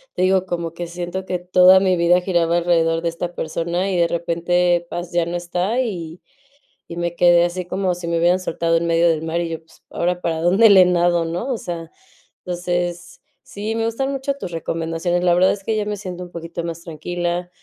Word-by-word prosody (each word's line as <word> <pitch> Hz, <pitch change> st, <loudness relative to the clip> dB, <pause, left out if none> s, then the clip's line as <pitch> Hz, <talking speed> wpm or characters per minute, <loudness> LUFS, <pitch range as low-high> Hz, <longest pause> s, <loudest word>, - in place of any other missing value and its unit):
te 185 Hz, -, 0 dB
digo, 190 Hz, 0 st, +3 dB
como 170 Hz, -2 st, -4 dB
que 175 Hz, 0 st, -5 dB
siento 175 Hz, +2 st, -5 dB
que 180 Hz, -1 st, -2 dB
toda 180 Hz, +1 st, +6 dB
mi 185 Hz, -1 st, +2 dB
vida 175 Hz, +1 st, +4 dB
giraba 175 Hz, -2 st, +1 dB
alrededor 165 Hz, -1 st, +2 dB
de 170 Hz, -, -2 dB
esta 175 Hz, +1 st, -5 dB
persona 170 Hz, +4 st, -2 dB
y 190 Hz, -, -1 dB
de 170 Hz, -1 st, +2 dB
repente, 175 Hz, +1 st, +1 dB
¡paz!, 175 Hz, 0 st, -6 dB
ya 175 Hz, -1 st, +2 dB
no 175 Hz, +1 st, -3 dB
está 180 Hz, +7 st, -2 dB
y 175 Hz, -9 st, -4 dB, 0.7 s
y 170 Hz, -, -6 dB
me 170 Hz, 0 st, -2 dB
quedé 175 Hz, -1 st, +5 dB
así 175 Hz, +1 st, -3 dB
como 185 Hz, 0 st, -1 dB
si 175 Hz, -1 st, -7 dB
me 170 Hz, -, 0 dB
hubieran 175 Hz, +2 st, +3 dB
soltado 165 Hz, -2 st, 0 dB
en 170 Hz, -, -2 dB
medio 170 Hz, 0 st, +3 dB
del 155 Hz, -1 st, 0 dB
mar 165 Hz, +1 st, -1 dB
y 170 Hz, -, -4 dB
yo: 165 Hz, -, -3 dB
"Pues, 160 Hz, -, -24 dB
ahora 180 Hz, +1 st, -1 dB
para 160 Hz, -1 st, -1 dB
dónde 195 Hz, +6 st, +5 dB
le 185 Hz, -2 st, +8 dB
nado, 175 Hz, -1 st, +2 dB
¿no?", 175 Hz, +11 st, -3 dB
o 235 Hz, -, -2 dB
sea, 165 Hz, -2 st, -6 dB, 0.5 s
entonces, 175 Hz, -1 st, -3 dB, 0.2 s
sí, 210 Hz, +2 st, -5 dB
me 225 Hz, 0 st, 0 dB
gustan 270 Hz, +4 st, -1 dB
mucho 275 Hz, +1 st, -2 dB
tus 275 Hz, -10 st, -7 dB
recomendaciones, 165 Hz, +2 st, -2 dB
la 175 Hz, -1 st, +4 dB
verdad 185 Hz, +2 st, +4 dB
es 200 Hz, -, -8 dB
que 220 Hz, +2 st, -1 dB
ya 210 Hz, -, -1 dB
me 210 Hz, 0 st, -2 dB
siento 180 Hz, -3 st, -7 dB
un 175 Hz, -, -15 dB
poquito 170 Hz, 0 st, -6 dB
más 170 Hz, 0 st, -6 dB
tranquila, 175 Hz, +2 st, -3 dB
175 Hz, 220 wpm, -20 LUFS, 170-185 Hz, 0.7 s, le